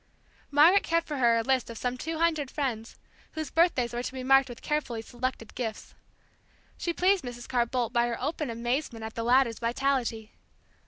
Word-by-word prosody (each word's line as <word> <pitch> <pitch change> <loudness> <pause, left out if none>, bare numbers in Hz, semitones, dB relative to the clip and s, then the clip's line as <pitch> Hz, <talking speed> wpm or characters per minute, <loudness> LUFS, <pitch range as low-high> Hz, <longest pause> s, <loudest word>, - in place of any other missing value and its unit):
Margaret 315 +7 +6
kept 335 0 0
for 295 - -3
her 235 -3 +4
a 230 - 0
list 260 -1 +1
of 230 - -7
some 250 +2 -2
two 320 +5 -4
hundred 315 -4 +1
friends, 240 -7 -3 0.4
whose 315 -3 -5
birthdays 325 -9 +2
were 240 - -2
to 250 - -5
be 260 -1 -5
marked 270 0 +5
with 240 - -10
carefully 275 -7 -2
selected 245 -1 -4
gifts. 225 -3 -5 0.8
She 345 - -2
pleased 370 +2 +2
Mrs. 240 -1 -7
Carr 240 -2 +1
Boldt 240 -1 -2
by 240 0 +3
her 235 - -3
open 295 0 -2
amazement 235 0 -2
at 220 - -7
the 230 - -4
latter's 240 0 +3
vitality. 235 -2 -1
255 Hz, 190 wpm, -28 LUFS, 235-295 Hz, 0.8 s, Margaret